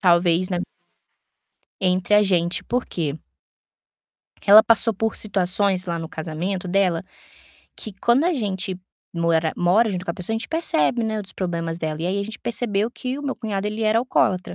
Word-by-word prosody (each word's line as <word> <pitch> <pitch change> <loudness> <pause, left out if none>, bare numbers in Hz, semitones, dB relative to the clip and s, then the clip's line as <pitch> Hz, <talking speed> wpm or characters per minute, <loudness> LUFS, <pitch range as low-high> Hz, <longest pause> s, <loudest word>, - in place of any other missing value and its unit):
talvez, 175 0 +3
né 180 - -1 1.2
entre 185 +2 +1
a 210 - +6
gente, 175 -3 0
por 245 +1 -1
quê? 155 -3 -3 1.2
porque - - -4
ela 215 +2 +10
passou 225 0 +4
por 225 +3 -2
situações 190 -1 +1
lá 170 -1 -2
no 160 - -6
casamento 170 +4 -4
dela 180 -2 +1 0.7
que 215 - -7
quando 245 +6 +3
a 355 -1 +2
gente 190 -5 -3 0.4
mora 165 -1 +1
mora 200 +6 +3
junto 180 -2 -4
com 170 - -2
a - - -5
pessoa, 190 +5 -4
a - - -1
gente - - -7
percebe, 245 - +1
né, 220 -1 -2
outros 200 -2 -6
problemas 170 -2 -3
dela. 155 -1 -4
E 170 - -2
aí 200 +2 -1
a - - -1
gente 215 +2 -7
percebeu 220 -2 0
que 255 +2 -5
o - - -7
meu 275 -2 -2
cunhado, 210 -4 -3
ele 215 +2 -3
era 220 +1 +3
alcoólatra. 195 -7 0
195 Hz, 185 wpm, -22 LUFS, 175-220 Hz, 1.2 s, ela